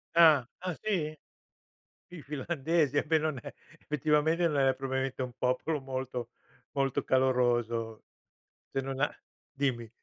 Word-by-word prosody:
Ah. 155 -7 +7
Ah 185 0 -3
sì? 170 -8 -1 1.0
I 170 -4 -8
finlandesi 150 +1 0
a - - +1
me 160 0 +4
non 155 -3 -1
è - - -8 0.3
effettivamente 155 +3 +2
non 150 -3 0
è 135 -1 +4
probabilmente 130 0 -2
un 125 -1 -4
popolo 130 +5 0
molto 130 -2 -4 0.4
molto 135 -2 0
caloroso. 120 -4 +1 0.7
Se 135 - -1
non 135 0 -4
a 145 - +3 0.4
dimmi. 130 -5 -1
135 Hz, 130 wpm, -30 LUFS, 130-155 Hz, 1.0 s, Ah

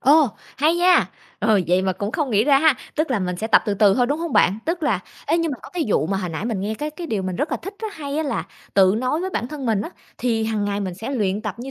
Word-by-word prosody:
Ồ, 295 +1 +5 0.3
hay 310 +4 +3
nha. 360 +1 +5 0.3
Rồi, 210 -3 +3
vậy 180 +1 +3
mà 190 -1 +1
cũng 200 +4 -4
không 290 -5 -1
nghĩ 210 0 +3
ra 275 -1 +5
ha. 310 -1 +5 0.2
Tức 310 -1 0
là 240 - +2
mình 180 -1 -2
sẽ 220 - -3
tập 225 - +5
từ 205 - +1
từ 200 -1 +5
thôi, 245 +2 +2
đúng 290 +4 -1
hông 335 -3 -3
bạn? 195 -3 +4
Tức 335 +1 -1
là 235 -11 +1 0.3
ê, 325 - +2
nhưng 330 -3 0
mà 255 - -6
có - - -11
cái 350 -3 -1
vụ 155 -6 +2
mà 195 - -1
hồi 180 - -3
nãy 160 +6 -4
mình 225 -5 -2
nghe 210 +3 -2
cái 300 +5 -4
cái 335 +2 -7
điều 215 -8 -2
mình 185 -1 -3
rất 300 - -1
là - - 0
thích 390 +3 -7
á, 440 - -4
hay 285 -2 -5
á, 315 - +1
là 275 -9 -2 0.3
tự 190 -1 +5
nói 255 +6 0
với 375 +1 -3
bản 240 -7 -2
thân 290 -4 -6
mình 220 -3 +2
á, - - -4 0.3
thì 225 -3 0
hằng 220 -2 -1
ngày 205 0 -1
mình 185 -3 -3
sẽ 220 +8 -6
luyện 210 -5 -1
tập 210 -3 -3
như 255 +3 -6
230 Hz, 315 wpm, -22 LUFS, 200-300 Hz, 0.3 s, Ồ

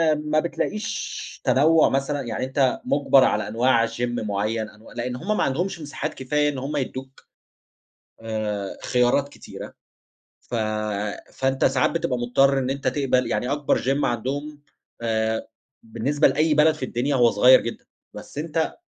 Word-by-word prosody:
ما 150 +1 0
بتلاقيش 210 +5 -4
تنوُّع 155 +4 +4
مثلًا، 140 +1 -1
يعني 125 +1 -3
أنت 130 -1 +1
مُجبَر 140 -2 +4
على 105 - +1
أنواع 115 +1 +2
gym 115 +1 -9 0.2
معيّن، 110 +1 -2
أنوا 110 +1 -16
لأن 125 +1 -3
هُم 205 +11 -2
ما - - +2
عَندهمش 175 +7 -1
مساحات 150 +1 -4
كفاية 150 +3 0
إن 140 - -4
هُم 140 +3 -4
يدّوك 130 0 -6 0.9
آآ 105 -3 -3
خيارات 125 +3 +2
كتيرة، - - -10 0.7
ف - - -9 0.8
فأنت 135 0 0
ساعات 125 - +3
بتبقى 140 -7 -1
مُضطر 135 +3 +3
إن 130 0 -1
أنت 140 +1 -1
تقبَل، 130 -3 +1
يعني 125 +3 -1
أكبر 145 -1 +1
gym 135 +3 +1
عَندهم 145 +5 -3 0.4
آآ 110 -1 -1 0.3
بالنسبة 120 +7 +1
لأي 155 +1 +2
بلد 155 +1 +5
في 155 - -5
الدنيا 130 +3 -1
هو 120 -2 +5
صغيّر 125 +5 +6
جدًا، 115 - -6 0.3
بس - - -9
أنت 160 +1 -1
135 Hz, 150 wpm, -23 LUFS, 120-145 Hz, 0.9 s, صغيّر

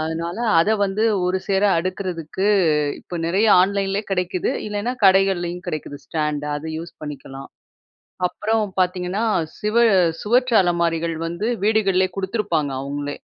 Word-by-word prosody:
அதுனால 165 +4 -3 0.2
அத 200 +6 +2
வந்து 200 +3 -1 0.2
ஒருசேர 190 +2 0 0.2
அடுக்குறதுக்கு, 185 0 -3 0.5
இப்ப 175 - -7
நிறைய 195 +6 +2
ஆன்லைன்லேயே 195 +2 0
கிடைக்குது. 180 -1 -1 0.2
இல்லனா, 210 +4 -2
கடைகள்லேயும் 190 -2 +3
கிடைக்குது. 155 -3 -5
ஸ்டாண்டு, 150 -2 -2
அத 145 - -8
யூஸ் 170 +1 -8
பண்ணிக்கலாம். 140 -2 -8 0.8
அப்புறம் 220 +4 -1 0.2
பாத்தீங்கன்னா, 180 +3 0 0.4
சிவ 210 +1 -2 0.5
சுவற்று 245 +2 +2
அலமாரிகள் 170 -2 0
வந்து 170 +6 -3 0.2
வீடுகள்லேயே 195 -4 +2
குடுத்துருப்பாங்க, 190 -7 -1
அவுங்களே. 145 +1 -4
185 Hz, 115 wpm, -21 LUFS, 165-200 Hz, 0.8 s, கடைகள்லேயும்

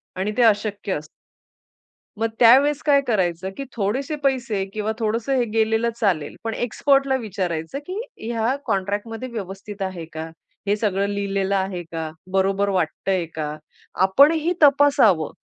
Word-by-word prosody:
आणि 190 +3 -1
ते 245 - +4
अशक्य 205 -2 +1
असतं. 150 -1 -5 1.1
मग 225 - +2
त्यावेळेस 275 +5 +6
काय 280 -1 +5
करायचं, 190 -4 0
की 275 - -4
थोडेसे 245 +9 -1
पैसे 235 -7 0
किंवा 215 0 -2
थोडंसं 230 +4 -1
हे 245 - +2
गेलेलं 225 +1 +2
चालेल 185 - 0
पण 225 -1 -2
एक्सपर्टला 275 +3 +1
विचारायचं, 185 - -3
की 380 +4 -4 0.3
ह्या 230 +3 0
कॉन्ट्रॅक्टमध्ये 210 +3 -2
व्यवस्थित 200 -2 -7
आहे 185 -4 -4
का? 160 +1 -5 0.4
हे 205 - +3
सगळं 200 -2 0
लिहिलेलं 200 -1 -1
आहे 190 -2 -1
का? 160 -1 -4 0.2
बरोबर 195 +1 +1
वाटतंय 185 0 0
का? 150 -1 -3 0.5
आपणही 300 - +4
तपासावं. 275 - +5
205 Hz, 135 wpm, -22 LUFS, 190-240 Hz, 1.1 s, त्यावेळेस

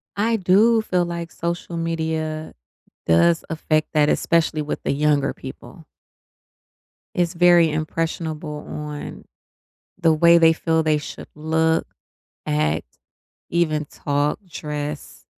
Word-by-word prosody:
I 225 +3 +1
do 215 +4 +4
feel 180 -4 0
like 170 -1 -5
social 170 0 -4
media 160 -1 -3 0.5
does 160 - +3
affect 155 -1 0
that, 150 -1 +4
especially 160 -2 +1
with 150 - -4
the - - +1
younger 145 -1 +1
people. 155 +5 -11 1.3
It's 175 0 0
very 175 -1 +5
impressionable 155 -1 -3
on 150 -1 -7 0.7
the 165 -3 +4
way 170 +2 +6
they 165 -1 +6
feel 160 -1 0
they 155 -1 +2
should 150 - -9
look, 160 +1 +1 0.6
act, 75 -2 -1 0.5
even 155 -3 0
talk, 145 +1 -1
dress 150 -2 -6
160 Hz, 115 wpm, -22 LUFS, 150-170 Hz, 1.3 s, way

